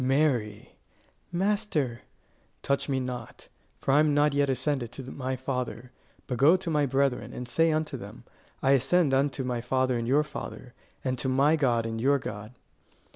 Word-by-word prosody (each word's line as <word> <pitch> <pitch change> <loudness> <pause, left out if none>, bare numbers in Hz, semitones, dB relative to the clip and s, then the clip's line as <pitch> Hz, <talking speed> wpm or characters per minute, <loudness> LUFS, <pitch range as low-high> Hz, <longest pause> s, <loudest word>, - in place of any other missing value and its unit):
"Mary!" 130 -6 0 0.6
"Master!" 175 - 0 0.6
"Touch 140 +1 0
me 135 -1 +1
not; 125 -2 -6 0.3
for - - -1
I 140 - +5
am 150 -1 +3
not 145 0 +3
yet 140 0 +2
ascended 135 -2 -1
to 135 - -6
my 130 -1 -3
Father; 125 -2 -4 0.3
but 125 - -4
go 155 +7 +6
to 180 -3 -4
my 150 -2 +2
brethren, 135 -1 0
and 125 - -6
say 165 +6 +2
unto 155 -2 -1
them, 115 +2 -10 0.4
I 135 - +4
ascend 140 +3 +3
unto 135 0 +1
my 125 -2 -2
Father 130 0 0
and 115 - -3
your 145 +4 +4
Father; 135 -4 -8 0.3
and 130 -2 -1
to 130 - -1
my 140 +4 +4
God 120 -6 +1
and 115 0 -3
your 140 +3 +4
God." 110 -1 -7
135 Hz, 175 wpm, -28 LUFS, 125-145 Hz, 0.6 s, go